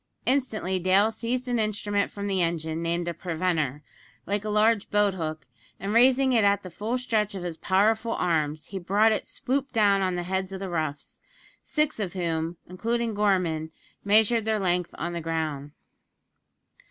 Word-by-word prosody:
Instantly 225 Hz, -9 st, 0 dB
Dale 190 Hz, +4 st, +4 dB
seized 245 Hz, +3 st, -3 dB
an 245 Hz, -1 st, 0 dB
instrument 205 Hz, -1 st, 0 dB
from 200 Hz, 0 st, -6 dB
the 195 Hz, -2 st, 0 dB
engine, 165 Hz, -1 st, -1 dB
named 170 Hz, +1 st, -1 dB
a 170 Hz, -, -1 dB
"preventer," 160 Hz, -4 st, -2 dB, 0.4 s
like 205 Hz, +1 st, -1 dB
a 215 Hz, -, -3 dB
large 215 Hz, 0 st, +2 dB
boat 205 Hz, -1 st, +3 dB
hook, 155 Hz, -3 st, -4 dB, 0.3 s
and, 200 Hz, +2 st, -3 dB
raising 260 Hz, +2 st, +5 dB
it 225 Hz, -3 st, +4 dB
at 200 Hz, 0 st, +3 dB
the 185 Hz, -, -8 dB
full 225 Hz, +7 st, -2 dB
stretch 220 Hz, -5 st, 0 dB
of 185 Hz, -, -5 dB
his 175 Hz, -2 st, -4 dB
powerful 220 Hz, +6 st, +1 dB
arms, 155 Hz, -3 st, 0 dB
he 195 Hz, -, -6 dB
brought 205 Hz, +5 st, +3 dB
it 215 Hz, -, -1 dB
swoop 270 Hz, +1 st, -2 dB
down 205 Hz, -4 st, +3 dB
on 185 Hz, -1 st, 0 dB
the 175 Hz, -, -2 dB
heads 190 Hz, +1 st, -2 dB
of 190 Hz, -, -5 dB
the 195 Hz, -1 st, -5 dB
roughs 155 Hz, -4 st, -4 dB, 0.4 s
six 300 Hz, -4 st, 0 dB
of 195 Hz, -4 st, -3 dB
whom, 165 Hz, -2 st, -2 dB
including 230 Hz, +5 st, -2 dB
Gorman, 180 Hz, -6 st, +1 dB, 0.3 s
measured 220 Hz, +3 st, +4 dB
their 220 Hz, -1 st, +1 dB
length 180 Hz, -2 st, +1 dB
on 170 Hz, +2 st, -3 dB
the 170 Hz, -, -3 dB
ground. 155 Hz, -3 st, -3 dB
195 Hz, 175 wpm, -26 LUFS, 170-220 Hz, 0.4 s, raising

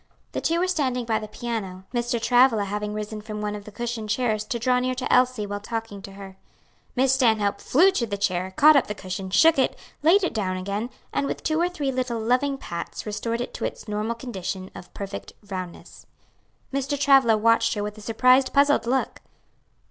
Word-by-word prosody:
The -, -, -3 dB
two 330 Hz, -, +1 dB
were 365 Hz, -, +1 dB
standing 260 Hz, -9 st, 0 dB
by 220 Hz, -1 st, +1 dB
the 215 Hz, -, -7 dB
piano, 210 Hz, -4 st, -5 dB
Mr. 240 Hz, 0 st, 0 dB
Travilla 240 Hz, -1 st, +4 dB
having 210 Hz, +1 st, -3 dB
risen 210 Hz, 0 st, -5 dB
from 210 Hz, 0 st, -6 dB
one 210 Hz, 0 st, -2 dB
of 205 Hz, -1 st, -9 dB
the 215 Hz, -, -10 dB
cushioned 230 Hz, -1 st, -4 dB
chairs 215 Hz, -2 st, 0 dB
to 235 Hz, -, -2 dB
draw 250 Hz, +1 st, +2 dB
near 255 Hz, 0 st, -1 dB
to 255 Hz, +1 st, -1 dB
Elsie 250 Hz, -4 st, +3 dB
while 205 Hz, 0 st, -4 dB
talking 225 Hz, -1 st, -5 dB
to 195 Hz, +1 st, -10 dB
her. 195 Hz, -1 st, -11 dB, 0.6 s
Miss 265 Hz, +1 st, +3 dB
Stanhope 220 Hz, -6 st, +2 dB
flew 355 Hz, +9 st, +4 dB
to 245 Hz, -11 st, -1 dB
the 200 Hz, -1 st, -3 dB
chair, 185 Hz, -2 st, -1 dB
caught 305 Hz, +1 st, +8 dB
up 275 Hz, -, +3 dB
the 210 Hz, -, -4 dB
cushion, 190 Hz, 0 st, -5 dB
shook 320 Hz, -, +5 dB
it, 260 Hz, -, +1 dB, 0.2 s
laid 350 Hz, +7 st, +5 dB
it 360 Hz, -, 0 dB
down 185 Hz, -4 st, -1 dB
again, 200 Hz, +5 st, -3 dB, 0.2 s
and 280 Hz, -, 0 dB
with -, -, -4 dB
two 315 Hz, +1 st, +1 dB
or 350 Hz, -, +2 dB
three 295 Hz, -7 st, -2 dB
little 250 Hz, -3 st, -2 dB
loving 255 Hz, +5 st, +1 dB
pats 170 Hz, -9 st, -6 dB
restored 230 Hz, +3 st, -2 dB
it 245 Hz, -, -5 dB
to -, -, -6 dB
its -, -, -4 dB
normal 210 Hz, +2 st, -2 dB
condition 190 Hz, -6 st, -5 dB
of 175 Hz, -, -11 dB
perfect 200 Hz, 0 st, -6 dB, 0.2 s
roundness. 185 Hz, -2 st, -7 dB, 0.7 s
Mr. 275 Hz, +1 st, -1 dB
Travilla 270 Hz, -5 st, +5 dB
watched 230 Hz, +1 st, +3 dB
her 205 Hz, -, -2 dB
with 210 Hz, 0 st, -5 dB
a 215 Hz, -, -12 dB
surprised, 255 Hz, +4 st, +3 dB
puzzled 280 Hz, -4 st, +3 dB
look. 265 Hz, +2 st, 0 dB
230 Hz, 205 wpm, -24 LUFS, 205-255 Hz, 0.7 s, caught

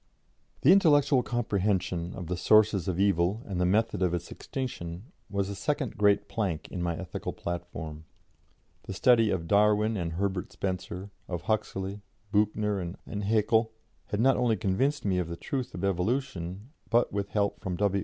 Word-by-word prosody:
" -, -, -37 dB
The 150 Hz, -, +7 dB
intellectual 145 Hz, -8 st, +5 dB
comprehension 95 Hz, -7 st, -1 dB
of 90 Hz, -, -6 dB
the 90 Hz, +2 st, -2 dB
sources 100 Hz, +1 st, +4 dB
of 95 Hz, -1 st, -1 dB
evil 100 Hz, +2 st, +2 dB
and 95 Hz, -3 st, -3 dB
the 90 Hz, -, +3 dB
method 110 Hz, +1 st, +1 dB
of 90 Hz, -1 st, +2 dB
its 85 Hz, 0 st, -6 dB
extinction 110 Hz, -, -6 dB, 0.2 s
was 100 Hz, -1 st, -1 dB
the 100 Hz, -, -4 dB
second 140 Hz, +2 st, -2 dB
great 100 Hz, -1 st, +3 dB
plank 95 Hz, -8 st, -2 dB
in 90 Hz, -, -4 dB
my 85 Hz, -1 st, -1 dB
ethical 95 Hz, -3 st, -5 dB
platform. 85 Hz, -3 st, -6 dB, 0.8 s
The 95 Hz, -, -5 dB
study 115 Hz, +1 st, +5 dB
of 85 Hz, -4 st, -1 dB
Darwin 105 Hz, +2 st, +3 dB
and 85 Hz, -3 st, -3 dB
Herbert 95 Hz, +1 st, -2 dB
Spencer, 95 Hz, +1 st, -4 dB, 0.2 s
of 85 Hz, -2 st, -4 dB
Huxley, 100 Hz, -1 st, -2 dB, 0.3 s
Büchner 105 Hz, -3 st, 0 dB
and 105 Hz, 0 st, -4 dB
Haeckel, 110 Hz, +1 st, +2 dB, 0.3 s
had 105 Hz, -, -2 dB
not 135 Hz, +3 st, +4 dB
only 120 Hz, -3 st, +2 dB
convinced 130 Hz, +10 st, 0 dB
me 95 Hz, -2 st, +2 dB
of 90 Hz, -, -1 dB
the 85 Hz, 0 st, -6 dB
truth 130 Hz, +4 st, -4 dB
of 90 Hz, -, -5 dB
evolution, 100 Hz, +1 st, -2 dB, 0.2 s
but, 120 Hz, 0 st, +2 dB
with 100 Hz, 0 st, -2 dB
help 100 Hz, -1 st, 0 dB
from 90 Hz, -2 st, -3 dB
W. 100 Hz, +1 st, +1 dB
100 Hz, 170 wpm, -28 LUFS, 90-110 Hz, 0.8 s, The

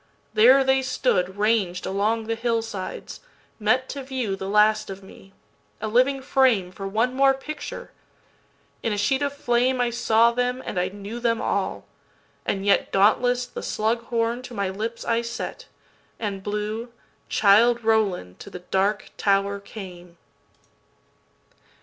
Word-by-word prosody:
There 250 Hz, +5 st, +6 dB
they 265 Hz, 0 st, +3 dB
stood, 190 Hz, -8 st, 0 dB
ranged 205 Hz, -4 st, +1 dB
along 210 Hz, +4 st, 0 dB
the 225 Hz, +1 st, -2 dB
hill 230 Hz, 0 st, 0 dB
sides, 205 Hz, -5 st, -7 dB, 0.4 s
metTo 260 Hz, +6 st, 0 dB
view 255 Hz, -7 st, -3 dB
the 195 Hz, 0 st, -6 dB
last 215 Hz, +1 st, +3 dB
of 195 Hz, 0 st, -8 dB
me, 195 Hz, 0 st, -15 dB, 0.5 s
a 215 Hz, -, -3 dB
living 255 Hz, +4 st, +2 dB
frameFor 205 Hz, -9 st, +1 dB
one 230 Hz, +5 st, +1 dB
more 270 Hz, 0 st, +4 dB
picture! 300 Hz, +3 st, -7 dB, 0.9 s
in 225 Hz, -, -1 dB
a -, -, -2 dB
sheet 265 Hz, +7 st, +1 dB
of 285 Hz, -1 st, 0 dB
flameI 245 Hz, -2 st, +1 dB
saw 230 Hz, 0 st, +4 dB
them 250 Hz, +1 st, -1 dB
and 185 Hz, -, -2 dB
I 180 Hz, -, +1 dB
knew 205 Hz, +4 st, -7 dB
them 230 Hz, -1 st, +1 dB
all. -, -, -2 dB, 0.6 s
And 195 Hz, 0 st, -1 dB
yetDauntless 245 Hz, +5 st, +2 dB
the -, -, -5 dB
slug 230 Hz, +2 st, -1 dB
horn 230 Hz, +1 st, -1 dB
to 250 Hz, -1 st, -10 dB
my 200 Hz, -2 st, -1 dB
lips 220 Hz, +4 st, -5 dB
I 230 Hz, 0 st, +1 dB
set, 235 Hz, 0 st, -6 dB, 0.5 s
And 200 Hz, -3 st, -3 dB
blew 210 Hz, +3 st, -4 dB, 0.4 s
"Childe 230 Hz, +4 st, +4 dB
Roland 205 Hz, -, 0 dB
to -, -, -10 dB
the 180 Hz, -, -10 dB
Dark 200 Hz, +2 st, +1 dB
Tower 200 Hz, 0 st, +1 dB
came." 180 Hz, -4 st, -11 dB
225 Hz, 140 wpm, -24 LUFS, 200-245 Hz, 0.9 s, There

